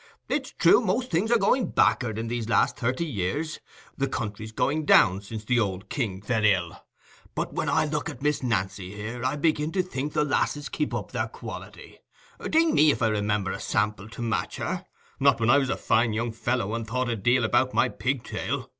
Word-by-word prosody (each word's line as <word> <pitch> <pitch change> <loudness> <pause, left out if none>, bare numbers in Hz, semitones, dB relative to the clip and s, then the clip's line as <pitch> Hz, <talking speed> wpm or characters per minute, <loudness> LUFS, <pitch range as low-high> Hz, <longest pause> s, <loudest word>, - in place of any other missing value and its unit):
It's 275 -3 -1
true, 175 +6 +6
most 235 +4 -1
things 190 +7 +1
are 235 - +6
gone 230 +4 +2
back'ard 110 -4 +2
in 115 +1 -3
these 115 -1 -3
last - - +3
thirty 130 +7 -1
years—the 140 - -4
country's 110 -3 -4
going 150 +7 0
down 95 -9 +5
since 105 +1 -7
the 125 +1 +2
old 95 -3 -2
king 100 -8 -3
fell 110 0 0
ill. 95 -5 +1 0.5
But - - -2
when - - -1
I - - +2
look 150 +1 -2
at 145 -3 -9
Miss 150 0 +1
Nancy 95 -5 -2
here, 115 +3 -6
I 130 +3 0
begin 155 0 +1
to 185 -1 +2
think 145 -4 -4
the 150 - +2
lasses 145 0 0
keep 150 - -2
up - - -4
their - - -1
quality;—ding 320 0 -4
me 155 - +5
if 145 - +1
I 115 - +4
remember 105 -2 0
a - - -5
sample 105 0 -1
to 120 - -7
match 115 -1 -1
her, - - -4 0.3
not - - +4
when 115 +1 +3
I 140 - +6
was 135 -2 -1
a - - 0
fine 115 0 +2
young 115 +2 -1
fellow, 115 -1 -1
and 115 -1 -3
thought 125 +2 -1
a 120 - 0
deal 120 +4 +2
about 130 +3 +2
my - - +4
pigtail. 130 -1 -3
120 Hz, 200 wpm, -26 LUFS, 105-150 Hz, 0.5 s, true